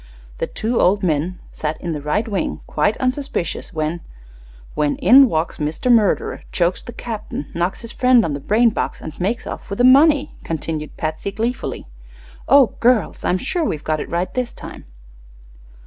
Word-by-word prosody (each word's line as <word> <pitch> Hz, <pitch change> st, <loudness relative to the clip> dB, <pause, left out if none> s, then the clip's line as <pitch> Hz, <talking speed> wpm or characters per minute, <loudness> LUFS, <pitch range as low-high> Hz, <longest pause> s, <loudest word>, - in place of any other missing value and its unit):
The -, -, -1 dB
two 230 Hz, +2 st, -2 dB
old 195 Hz, +2 st, +3 dB
men 170 Hz, +2 st, 0 dB
sat 155 Hz, 0 st, -4 dB
in 175 Hz, -, -4 dB
the 150 Hz, -2 st, -4 dB
right 150 Hz, +10 st, -1 dB
wing, 200 Hz, -4 st, -2 dB
quite 210 Hz, -, 0 dB
unsuspicious, 255 Hz, -7 st, -2 dB
when 155 Hz, +1 st, -2 dB, 0.4 s
" -, -, -22 dB
"When 150 Hz, -1 st, 0 dB
in 260 Hz, +6 st, +7 dB
walks 160 Hz, +1 st, -2 dB
Mr. 155 Hz, +11 st, 0 dB
Murderer, 220 Hz, -5 st, +2 dB
chokes 175 Hz, 0 st, 0 dB
the -, -, -9 dB
captain, 220 Hz, -, -6 dB
knocks 175 Hz, +3 st, -2 dB
his 230 Hz, -1 st, -9 dB
friend 250 Hz, -2 st, +4 dB
on 155 Hz, -, -2 dB
the 140 Hz, -, -3 dB
brain 225 Hz, -, +3 dB
box, -, -, -3 dB
and 155 Hz, -, -7 dB
makes 210 Hz, +7 st, -1 dB
off -, -, -7 dB
with 200 Hz, -, -4 dB
the 245 Hz, -, +2 dB
money!" 285 Hz, +3 st, +5 dB
continued 155 Hz, -1 st, -4 dB
Patsy, 160 Hz, +5 st, -3 dB
gleefully. 230 Hz, +4 st, -3 dB, 0.6 s
"Oh, 275 Hz, -6 st, +6 dB
girls, 240 Hz, -3 st, +2 dB
I'm 180 Hz, -, +1 dB
sure 330 Hz, -, -2 dB
we've 155 Hz, -, -2 dB
got 155 Hz, -1 st, -1 dB
it -, -, -5 dB
right 175 Hz, +2 st, -2 dB
this 250 Hz, -1 st, -2 dB
time." -, -, -10 dB
195 Hz, 180 wpm, -20 LUFS, 155-240 Hz, 0.6 s, in